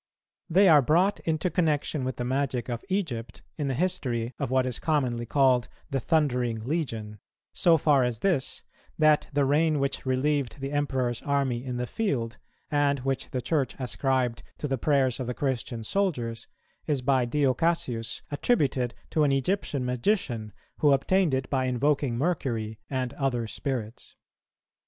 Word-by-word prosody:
They 190 Hz, +4 st, +5 dB
are 155 Hz, -4 st, +7 dB
brought 175 Hz, +9 st, +2 dB
into 160 Hz, +2 st, 0 dB
connexion 150 Hz, -4 st, 0 dB
with 130 Hz, -1 st, -2 dB
the 120 Hz, -, -3 dB
magic 130 Hz, -1 st, -1 dB
of 120 Hz, -1 st, -4 dB
Egypt 145 Hz, -, -3 dB
in 145 Hz, -3 st, -2 dB
the 135 Hz, -, -1 dB
history 130 Hz, -9 st, -1 dB
of 140 Hz, -4 st, -2 dB
what 130 Hz, 0 st, +2 dB
is 125 Hz, -3 st, -2 dB
commonly 125 Hz, -7 st, 0 dB
called 130 Hz, -2 st, +3 dB, 0.2 s
the 135 Hz, -, +1 dB
Thundering 125 Hz, -7 st, +1 dB
Legion, 115 Hz, -9 st, -3 dB, 0.3 s
so 170 Hz, -2 st, +4 dB
far 145 Hz, -3 st, +3 dB
as 120 Hz, -2 st, -2 dB
this, 175 Hz, -9 st, 0 dB, 0.3 s
that 155 Hz, -1 st, +4 dB
the 145 Hz, -1 st, +2 dB
rain 155 Hz, +3 st, +3 dB
which 140 Hz, 0 st, -1 dB
relieved 135 Hz, +1 st, 0 dB
the 135 Hz, +1 st, -4 dB
Emperor's 130 Hz, -5 st, -1 dB
army 135 Hz, -4 st, 0 dB
in 125 Hz, -2 st, -4 dB
the 125 Hz, -, -1 dB
field, 120 Hz, -, -2 dB, 0.3 s
and 145 Hz, -2 st, +2 dB
which 135 Hz, 0 st, -2 dB
the 130 Hz, -, -3 dB
Church 145 Hz, -1 st, 0 dB
ascribed 130 Hz, -2 st, 0 dB, 0.2 s
to 150 Hz, -, -3 dB
the 135 Hz, -2 st, -1 dB
prayers 135 Hz, -2 st, +2 dB
of 130 Hz, -, -3 dB
the 125 Hz, -, -3 dB
Christian 125 Hz, -4 st, -2 dB
soldiers, 120 Hz, -, -1 dB, 0.4 s
is 140 Hz, -4 st, 0 dB
by 130 Hz, -1 st, +3 dB
Dio 135 Hz, +1 st, +2 dB
Cassius 125 Hz, -7 st, -1 dB
attributed 140 Hz, -, +1 dB, 0.2 s
to 155 Hz, -, +2 dB
an 145 Hz, -, +3 dB
Egyptian 140 Hz, -1 st, 0 dB
magician, 125 Hz, -, -1 dB, 0.3 s
who 145 Hz, -2 st, +5 dB
obtained 160 Hz, +2 st, +2 dB
it 130 Hz, 0 st, -2 dB
by 130 Hz, -2 st, +1 dB
invoking 130 Hz, 0 st, +1 dB
Mercury 120 Hz, -8 st, -1 dB
and 130 Hz, -3 st, -2 dB
other 125 Hz, -4 st, -1 dB
spirits. 115 Hz, -1 st, -5 dB
135 Hz, 160 wpm, -27 LUFS, 125-150 Hz, 0.4 s, are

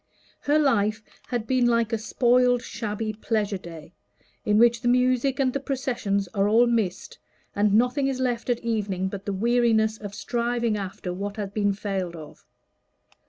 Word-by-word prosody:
Her 290 Hz, +2 st, +2 dB
life 220 Hz, -7 st, +1 dB, 0.2 s
had 240 Hz, -3 st, -2 dB
been 250 Hz, 0 st, +2 dB
like 235 Hz, -1 st, +1 dB
a 225 Hz, -, 0 dB
spoiled 245 Hz, +2 st, +2 dB
shabby 215 Hz, 0 st, -4 dB
pleasure 210 Hz, -2 st, -2 dB
day, 165 Hz, -2 st, -11 dB, 0.5 s
in 210 Hz, -2 st, +2 dB
which 235 Hz, +1 st, +4 dB
the -, -, -2 dB
music 255 Hz, +2 st, +2 dB
and 260 Hz, -2 st, +2 dB
the 275 Hz, -, -1 dB
processions 250 Hz, -8 st, -2 dB
are 195 Hz, +2 st, 0 dB
all 230 Hz, +3 st, +5 dB
missed, 220 Hz, -6 st, -2 dB, 0.4 s
and 205 Hz, 0 st, +2 dB
nothing 250 Hz, +4 st, +2 dB
is 265 Hz, -1 st, -2 dB
left 245 Hz, -2 st, -1 dB
at 240 Hz, -1 st, 0 dB
evening 200 Hz, -5 st, -1 dB
but 200 Hz, +1 st, -8 dB
the -, -, 0 dB
weariness 220 Hz, +1 st, +2 dB
of 205 Hz, -1 st, -8 dB
striving 235 Hz, -2 st, -1 dB
after 190 Hz, -2 st, -5 dB
what 200 Hz, +3 st, -5 dB
has 200 Hz, -2 st, -4 dB
been 205 Hz, -1 st, +1 dB
failed 195 Hz, -4 st, -3 dB
of. 155 Hz, -2 st, -12 dB
225 Hz, 165 wpm, -25 LUFS, 200-245 Hz, 0.5 s, all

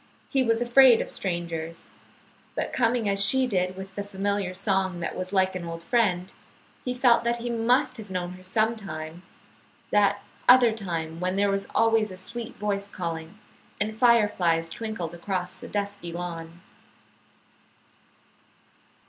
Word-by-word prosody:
He 270 Hz, -, +2 dB
was 230 Hz, -1 st, +2 dB
afraid 245 Hz, -1 st, +7 dB
of -, -, -3 dB
strangers; 170 Hz, -3 st, -4 dB, 0.7 s
but -, -, -2 dB
coming 230 Hz, -2 st, +1 dB
as 200 Hz, 0 st, +2 dB
she 260 Hz, +6 st, +4 dB
did 185 Hz, -5 st, -1 dB
with 190 Hz, 0 st, -8 dB
the 205 Hz, -, -4 dB
familiar 200 Hz, -1 st, -2 dB
song 190 Hz, -2 st, 0 dB
that 165 Hz, -, -3 dB
was 185 Hz, 0 st, -5 dB
like 190 Hz, -1 st, +2 dB
an 185 Hz, -2 st, -4 dB
old 165 Hz, 0 st, -6 dB
friend, 190 Hz, -7 st, +1 dB, 0.5 s
he 250 Hz, 0 st, -2 dB
felt 245 Hz, -2 st, +4 dB
that 235 Hz, 0 st, +1 dB
he 240 Hz, 0 st, -4 dB
must 240 Hz, +3 st, +2 dB
have 215 Hz, -3 st, -9 dB
known 180 Hz, -1 st, -3 dB
her 185 Hz, 0 st, -11 dB
sometime, 185 Hz, -6 st, -2 dB, 0.7 s
that 205 Hz, -1 st, +3 dB, 0.3 s
other 250 Hz, -2 st, +8 dB
time 165 Hz, -6 st, -4 dB
when 185 Hz, +1 st, -1 dB
there 200 Hz, 0 st, +2 dB
was 195 Hz, 0 st, -1 dB
always 225 Hz, -1 st, +3 dB
a 185 Hz, -, -9 dB
sweet 230 Hz, +5 st, -5 dB
voice 200 Hz, -1 st, -2 dB
calling, 165 Hz, 0 st, -5 dB, 0.4 s
and 215 Hz, +1 st, -1 dB
fireflies 205 Hz, -9 st, +3 dB
twinkled 215 Hz, -7 st, -4 dB
across 180 Hz, +1 st, -4 dB
a -, -, -8 dB
dusky 200 Hz, -4 st, -4 dB
lawn. 170 Hz, -1 st, -6 dB
200 Hz, 150 wpm, -26 LUFS, 180-225 Hz, 0.7 s, other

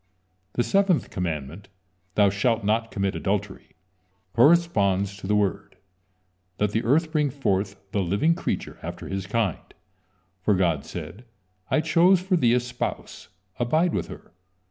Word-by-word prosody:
The 120 Hz, -, +1 dB
seventh 195 Hz, -1 st, +2 dB
commandment: 85 Hz, +1 st, -4 dB, 0.5 s
"Thou 100 Hz, -2 st, +4 dB
shalt 115 Hz, +3 st, 0 dB
not 115 Hz, +2 st, +1 dB
commit 100 Hz, -2 st, -1 dB
adultery," 100 Hz, 0 st, -3 dB, 0.6 s
corresponds 105 Hz, -, +3 dB
to 95 Hz, -, -8 dB
the 105 Hz, -, +2 dB
word: 100 Hz, -3 st, -1 dB, 0.8 s
"Let 105 Hz, -1 st, +1 dB
the 110 Hz, +2 st, 0 dB
earth 155 Hz, +6 st, +2 dB
bring 150 Hz, -3 st, +1 dB
forth 100 Hz, -7 st, -1 dB, 0.2 s
the 100 Hz, -, 0 dB
living 100 Hz, -, +2 dB
creature -, -, -4 dB
after -, -, -7 dB
his 95 Hz, -1 st, -4 dB
kind," 105 Hz, -5 st, 0 dB, 0.8 s
for 105 Hz, +2 st, +2 dB
God 85 Hz, -6 st, +1 dB
said: 120 Hz, +6 st, -8 dB, 0.4 s
"I 155 Hz, -, +2 dB
chose 180 Hz, +3 st, +4 dB
for 185 Hz, +1 st, 0 dB
thee 120 Hz, -8 st, +3 dB
a -, -, +4 dB
spouse, 125 Hz, 0 st, -5 dB, 0.3 s
abide 155 Hz, +8 st, +2 dB
with -, -, -2 dB
her." -, -, -12 dB
105 Hz, 145 wpm, -25 LUFS, 95-145 Hz, 0.8 s, Thou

